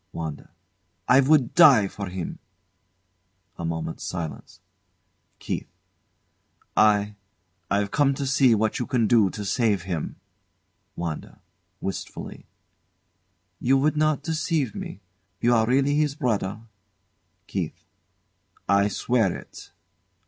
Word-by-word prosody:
WANDA. 80 -3 -6 0.6
I 125 - +6
would 140 -2 +3
die 140 - +7
for 100 +1 -6
him! 90 -2 -5 1.2
[A - - -4
moment's 80 -1 -4
silence.] 85 -4 -6 0.8
KEITH. - - -4 1.1
I 105 -1 +4 0.6
I've 100 0 0
come 140 -2 +2
to 140 - -3
see 130 -3 +4
what 110 0 0
you 125 - -2
can 125 -4 +1
do 110 -3 +4
to 105 +3 -6
save 100 -3 +1
him. 85 -5 -4 0.8
WANDA, 85 -3 -5 0.4
[Wistfully] 95 - -6 1.1
You 135 +2 +3
would 150 +3 +2
not 155 -1 +1
deceive 155 - -1
me. 95 - -7 0.4
You 120 +4 +3
are 110 -1 +3
really 135 +3 +2
his 150 -1 +1
brother? 110 - -1 0.8
KEITH. - - -5 0.8
I 100 +1 +4
swear 110 -1 +1
it. - - -13
110 Hz, 110 wpm, -25 LUFS, 100-135 Hz, 1.2 s, die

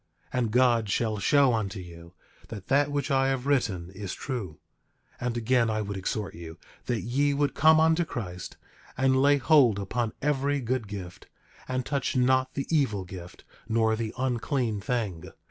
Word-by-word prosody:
10:29 125 - 0
And 115 -3 0
God 120 -3 +3
shall 110 +1 0
show 140 +4 +4
unto 100 -4 -2
you, 85 -1 -12 0.3
that 100 -5 -9
that 145 +1 +3
which 145 +1 -2
I 135 0 +3
have 135 -1 -1
written 100 -11 0
is 95 -1 -6
true. 105 - -5 0.6
10:30 125 - -1
And 120 -1 -2
again 120 0 +2
I 110 0 0
would 100 0 -5
exhort 100 +2 -3
you 85 0 -9 0.3
that 120 -3 -1
ye 140 +4 +1
would 145 0 +1
come 155 +1 +5
unto 160 +2 +3
Christ, 95 - -6 0.4
and 130 0 +3
lay 145 +1 +5
hold 135 -7 +4
upon 110 +3 -2
every 145 0 0
good 125 -2 -2
gift, 95 -2 -8 0.4
and 130 -1 -2
touch 140 -1 -1
not 130 +1 +2
the 140 - -2
evil 110 -10 +1
gift, 90 -1 -10 0.3
nor 110 0 +2
the 110 -1 -3
unclean 125 -3 -1
thing. 105 -7 -3
120 Hz, 175 wpm, -27 LUFS, 100-135 Hz, 0.6 s, come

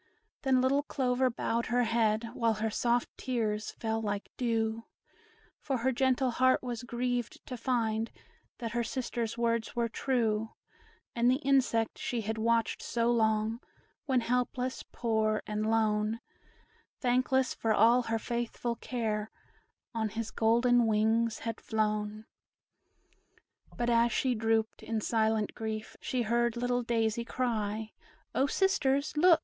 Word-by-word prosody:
Then 260 -2 +3
little 270 +2 +3
Clover 260 -3 +1
bowed 235 0 -1
her 245 +1 +2
head, 225 -1 +1
While 230 -2 +1
her 220 +1 -1
soft 240 +2 0
tears 220 -4 -1
fell 225 0 -2
like 205 -2 -3
dew; 225 -2 -1 0.7
For 270 -3 -1
her 255 +3 +1
gentle 260 0 +2
heart 255 +2 +3
was 240 -2 -4
grieved, 245 0 -3
to 255 - -5
find 230 -2 0 0.5
That 230 -2 -4
her 240 +1 0
sisters' 235 -2 -3
words 230 0 0
were 235 -1 +1
true, 225 -2 0 0.6
And 235 +1 +3
the 255 - +4
insect 250 -5 +2
she 240 -2 -2
had 220 +1 -3
watched 230 0 +1
so 235 0 +1
long 220 0 +1 0.5
When 260 -3 +3
helpless, 250 +2 -1
poor, 220 -2 0
and 215 +1 -1
lone, 215 0 +1 0.8
Thankless 255 +1 +2
for 225 - -1
all 230 +3 +5
her 225 -1 -1
faithful 235 0 -3
care, 220 -4 -2 0.6
On 220 -1 -1
his 225 +1 -4
golden 235 +1 +3
wings 220 +1 +2
had 230 -1 -3
flown. 215 0 -1 1.5
But 240 0 +1
as 235 0 +4
she 255 +3 +1
drooped, 225 -1 0
in 225 -1 -2
silent 220 -1 +1
grief, 220 -1 -5
She 250 -2 -1
heard 235 +1 +1
little 245 0 0
Daisy 230 -1 0
cry, 220 -3 -2 0.4
"O 270 - +2
sisters, 280 -6 +1
look! 335 +2 +6
230 Hz, 135 wpm, -31 LUFS, 220-245 Hz, 1.5 s, look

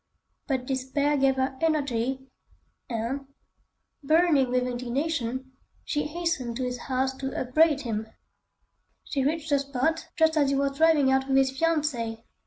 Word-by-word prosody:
But 260 -4 -1
despair 270 +3 0
gave 270 -1 +3
her 265 0 -1
energy, 265 -5 0 0.6
and, 245 +4 -3 0.7
burning 310 -3 +3
with 250 0 +1
indignation, 255 +1 -2 0.3
she 295 -1 -1
hastened 300 -8 -2
to 260 - -2
his 250 -1 -3
house 265 +1 -1
to 270 0 -4
upbraid 295 +3 +3
him. 220 -3 -3 1.0
She 275 -3 -2
reached 315 +2 -1
the 285 - +4
spot 280 +4 -1
just 320 -1 +3
as 285 -2 +3
he 275 - +1
was 275 0 0
driving 310 -4 +4
out 265 0 +2
with 270 0 +2
his 265 -1 +3
fiancée. 270 -7 -1
270 Hz, 145 wpm, -27 LUFS, 255-300 Hz, 1.0 s, the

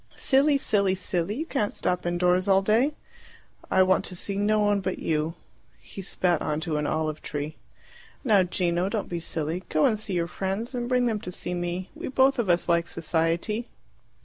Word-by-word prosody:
"Silly, 280 +1 +3
silly, 200 -7 +1
silly! 180 +1 -2
You 310 +6 -3
can't 240 -10 -1
stop 180 -1 0
indoors 180 +2 +2
all 195 0 +4
day!" 240 +9 +2 0.7
"I 190 - +5
want 185 0 +3
to 185 - -5
see 195 +3 -2
no 210 +2 +2
one 205 -1 +2
but 185 0 -2
you." 155 +1 -1 0.4
He 195 - -9
spat 180 -3 0
on 150 0 -1
to 160 -3 -2
an 150 0 -1
olive 155 -1 -2
tree. 150 +1 -5 0.7
"Now, 215 -7 +5
Gino, 180 0 0
don't 215 -1 -3
be 170 - -3
silly. 160 +1 -2
Go 155 - +3
and 215 -3 +2
see 215 -2 -4
your 170 -2 +1
friends, 195 +7 -3
and 240 -1 -3
bring 250 -1 +2
them 225 -3 0
to 180 - -6
see 180 - -4
me. 175 +1 -3
We - - -6
both 265 0 +3
of 220 -6 0
us 175 0 +2
like 170 -1 +2
society." 170 +8 -1
185 Hz, 195 wpm, -26 LUFS, 170-215 Hz, 0.7 s, I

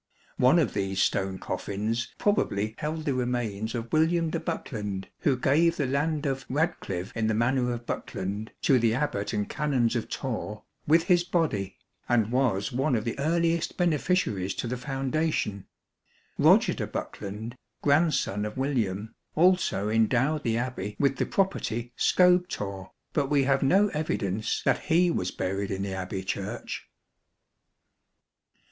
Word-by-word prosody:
One 130 +7 +5
of 155 -9 +2
these 95 -1 -1
stone 95 -1 +1
coffins 110 +6 -2
probably 110 - +1
held 155 +1 -3
the 140 - +1
remains 120 -4 -2
of 115 0 -5
William 160 +1 +2
de - - -1
Bokelond, 105 -6 -4
who 140 -6 +2
gave 165 +6 +3
the 145 - +1
land 150 +3 0
of 135 -1 -2
" - - -37
Radeclyve 120 - -2
in 110 -2 0
the 110 - +1
Manor 125 +2 +1
of 120 0 -5
Bokelond 105 +2 -4
" - - -47
to 130 -3 +5
the 115 -1 +2
Abbat 110 -7 -1
and 105 -2 -1
Canons 130 -6 0
of 115 - -2
Torre 110 -5 -4
" - - -40
with 165 +2 +5
his 175 -1 +3
body," 155 - -1 0.3
and 115 -2 +2
was 125 -4 +1
one 130 +2 +1
of 110 - 0
the 115 - -3
earliest 165 +2 +1
beneficiaries 150 - +1
to - - -3
the 125 - -2
foundation. 135 - -2 0.7
Roger - - +5
de - - -3
Bokelond, 105 +3 -5 0.3
grandson 140 - +2
of 105 +2 -5
William, 110 -7 -1 0.2
also 180 - +3
endowed 125 +7 +2
the 115 -4 0
Abbey 115 -5 -3
with 135 -2 +2
the - - 0
property 120 - -1
Scobethorre, 175 - +2 0.2
but 145 -3 +1
we 145 -2 +3
have 135 0 +2
no 195 +10 +4
evidence 110 - -2
that 130 -2 +1
he 175 +1 +4
was 90 - -1
buried 95 +1 -2
in 95 0 -2
the 100 -1 -3
Abbey 95 0 -4
Church. 100 +4 -5
125 Hz, 155 wpm, -27 LUFS, 105-150 Hz, 0.7 s, One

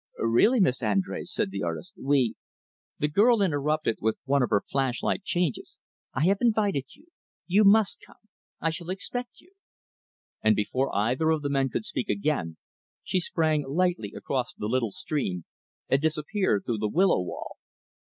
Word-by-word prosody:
"Really, 120 - +3
Miss 135 -10 +3
Andrés," 100 -4 -1
said 95 - -1
the 100 0 -4
artist, 85 -1 -4
"we 135 -4 +1 0.3
" - - -77
The 150 - +3
girl 220 +9 +4
interrupted 150 - 0
with 110 +1 0
one 140 +1 +2
of 125 - +1
her 100 -2 +2
flash 135 -3 -1
like - - 0
changes. 175 -8 -2 0.4
"I 135 - +1
have 195 +2 +3
invited 205 - +1
you. 310 +4 -23 0.4
You 200 +4 +4
must 210 0 +5
come. - - -17 0.4
I 165 - 0
shall 170 +2 -7
expect 245 +6 -5
you." 365 - -24 0.9
And 110 0 +4
before 130 +6 0
either 125 +10 +1
of 160 -2 +1
the 145 - -1
men 135 -1 +1
could 215 - -3
speak 210 0 -3
again, 135 - -1 0.5
she 185 - 0
sprang 160 -3 0
lightly 175 - 0
across 130 -3 -3
the - - -5
little 115 +1 0
stream, 95 - -3 0.4
and 135 - +2
disappeared 155 - 0
through 115 -3 -1
the 105 0 0
willow 180 - +3
wall. 90 - -7
145 Hz, 170 wpm, -27 LUFS, 115-185 Hz, 0.9 s, must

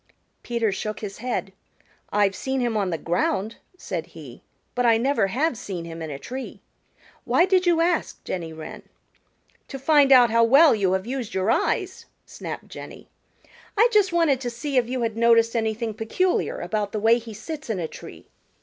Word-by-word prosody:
Peter 235 -3 -1
shook 215 +2 -4
his 200 -2 -7
head. 235 -5 -3 0.6
"I've 205 -1 +2
seen 265 +5 -2
him 240 -3 0
on 200 -3 0
the 165 - -2
ground," 190 +6 -1 0.2
said 170 - -5
he, 145 -7 -12 0.3
"but 250 - 0
I 230 -2 +5
never 260 -3 +1
have 265 +8 0
seen 190 -7 -6
him 165 0 -8
in 160 - -5
a 140 - -5
tree. 260 - -7 0.6
Why 345 - +3
did 370 -1 +2
you 335 -1 +4
ask, 340 -1 -1
Jenny 170 -3 -4
Wren?" 160 -1 -9 0.9
"To 270 - -7
find 280 0 +4
out 245 -3 +7
how 230 0 +4
well 280 +7 +6
you 195 -4 +1
have 190 +1 -1
used 250 -4 -4
your 190 +4 +1
eyes," 375 - -1 0.2
snapped - - -8
Jenny. - - -11 0.7
"I 460 +4 +5
just 415 -4 +3
wanted 325 -6 +2
to 245 - -2
see 275 +4 -5
if 245 -2 +2
you 255 -1 -2
had 225 -1 -2
noticed 230 0 +4
anything 225 0 -1
peculiar 235 - -1
about 210 -2 -2
the 215 - -1
way 225 +3 +4
he 225 -2 -10
sits 295 +6 -7
in 220 - -1
a 170 -3 -2
tree. - - -12
230 Hz, 185 wpm, -24 LUFS, 200-270 Hz, 0.9 s, out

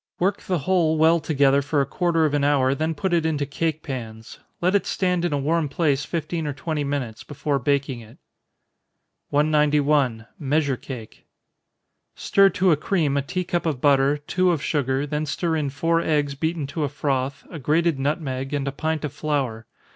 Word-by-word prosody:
Work 195 +3 0
the 185 - -1
whole 160 0 +1
well 160 +2 +5
together 140 -3 +3
for 145 +1 0
a 140 - +2
quarter 165 -1 +1
of 150 - 0
an 145 -1 +1
hour, 135 -2 +3
then 160 +3 -1
put 175 +4 -1
it 170 -2 +3
into 150 -3 0
cake 155 +2 -2
pans. 115 -4 -7 0.2
Let 180 +2 +1
it 200 - +1
stand 180 -2 0
in 175 - 0
a 145 - +1
warm 155 +2 0
place 140 -2 +1
fifteen 165 -1 -3
or 145 - -2
twenty 150 +2 -3
minutes, 135 -6 -3
before 145 -1 -2
baking 140 -1 0
it. 115 0 -14 1.1
191. 145 -5 +2
Measure 145 -1 +1
Cake. 110 - -10 0.9
Stir 195 0 +4
to 185 -1 +2
a - - +5
cream 155 -3 0
a 140 - +2
tea 180 +7 -3
cup 175 -1 -2
of 150 -6 -1
butter, 140 +1 +3
two 180 +5 0
of 160 -5 -2
sugar, 135 -2 0
then 150 +1 -2
stir 165 +3 -1
in 150 -3 -1
four 165 +4 +1
eggs 145 -3 0
beaten 160 +1 -2
to 150 +3 -3
a 145 - 0
froth, 140 -1 -2
a 165 - -6
grated 155 +1 +1
nutmeg, 135 -1 -2
and 140 -1 -2
a - - 0
pint 160 +2 -2
of 145 - -5
flour. 135 -8 -2
145 Hz, 190 wpm, -23 LUFS, 140-160 Hz, 1.1 s, well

